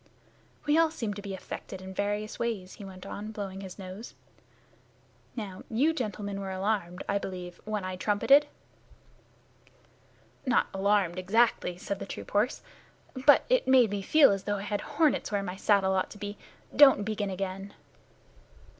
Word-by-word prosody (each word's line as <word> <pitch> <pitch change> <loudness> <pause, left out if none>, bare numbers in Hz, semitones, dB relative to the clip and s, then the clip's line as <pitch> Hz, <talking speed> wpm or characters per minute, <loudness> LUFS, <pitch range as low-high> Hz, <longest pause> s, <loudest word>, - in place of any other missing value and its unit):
"We 300 +2 +4
all 330 -1 +5
seem 230 -9 -4
to 205 - -7
be 200 -1 -5
affected 190 0 -8
in 190 0 -8
various 205 +2 -2
ways," 210 -6 -3
he - - -11
went 190 -1 -10
on, 210 +2 -6
blowing 195 -3 -6
his 190 -2 -9
nose. 195 +3 -9 1.2
"Now, 200 -6 -6
you 275 +8 +2
gentlemen 205 - -4
were 195 - -4
alarmed, 190 -2 -2
I 200 - +1
believe, 180 -2 -7
when 210 -2 -2
I 185 0 -4
trumpeted." 270 +10 +4 2.0
"Not 255 -3 +3
alarmed, 195 -2 +1
exactly," 195 -2 +2
said 195 +2 -4
the - - -6
troop - - -8
horse, 210 +5 +1 0.6
"but 290 - +7
it - - +2
made 255 -5 +5
me 205 -1 -2
feel 290 +6 +6
as 195 -1 -2
though 205 0 0
I 200 - -5
had 205 0 -2
hornets 300 -4 +1
where 200 -1 0
my 180 -1 -5
saddle 195 -1 +3
ought 185 -1 0
to - - -11
be. 205 0 -5 0.4
Don't 270 -8 +7
begin 210 -1 -2
again." 195 +1 -5
205 Hz, 165 wpm, -29 LUFS, 190-220 Hz, 2.0 s, but